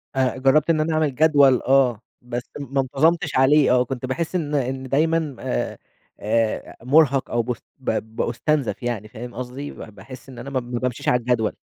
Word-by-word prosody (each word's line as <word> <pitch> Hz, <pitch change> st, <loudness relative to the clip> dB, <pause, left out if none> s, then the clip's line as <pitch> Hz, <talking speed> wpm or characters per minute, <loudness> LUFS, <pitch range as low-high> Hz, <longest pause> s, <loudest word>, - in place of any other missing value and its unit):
آآ، 130 Hz, 0 st, +1 dB
جربت 135 Hz, +4 st, +3 dB
إن 155 Hz, -2 st, +3 dB
أنا 160 Hz, +1 st, 0 dB
أعمل 155 Hz, -4 st, 0 dB
جدول 145 Hz, -3 st, +5 dB
آه، 130 Hz, -4 st, +3 dB, 0.2 s
بس 120 Hz, 0 st, -5 dB, 0.2 s
ما 140 Hz, -1 st, -1 dB
انتظمتش 155 Hz, +4 st, +1 dB
عليه 135 Hz, +2 st, +5 dB
آه، 125 Hz, 0 st, +4 dB
كنت 130 Hz, 0 st, -5 dB
باحس 165 Hz, +7 st, -3 dB
إن 150 Hz, -4 st, -1 dB
إن 130 Hz, 0 st, -1 dB
دايمًا 155 Hz, 0 st, +1 dB
آآ -, -, -3 dB, 0.4 s
آآ 110 Hz, +1 st, -1 dB
مرهق 140 Hz, 0 st, +3 dB
أو 120 Hz, -, +2 dB
باست 120 Hz, -1 st, -5 dB, 0.2 s
ب 110 Hz, -3 st, -3 dB
بأُستنزف 130 Hz, +3 st, -1 dB
يعني، 110 Hz, -3 st, -3 dB
فاهم 120 Hz, +2 st, -9 dB
قصدي؟ 130 Hz, +3 st, -6 dB
ب -, -, -14 dB, 0.2 s
باحس 130 Hz, +6 st, -12 dB
إن 125 Hz, -, -10 dB
أنا 130 Hz, +4 st, -7 dB
ما 130 Hz, -2 st, -1 dB
ما 120 Hz, 0 st, -5 dB
بامشيش 125 Hz, -2 st, -2 dB
على 125 Hz, -, +3 dB
الجدول. 120 Hz, -2 st, 0 dB
130 Hz, 185 wpm, -22 LUFS, 120-145 Hz, 0.4 s, جدول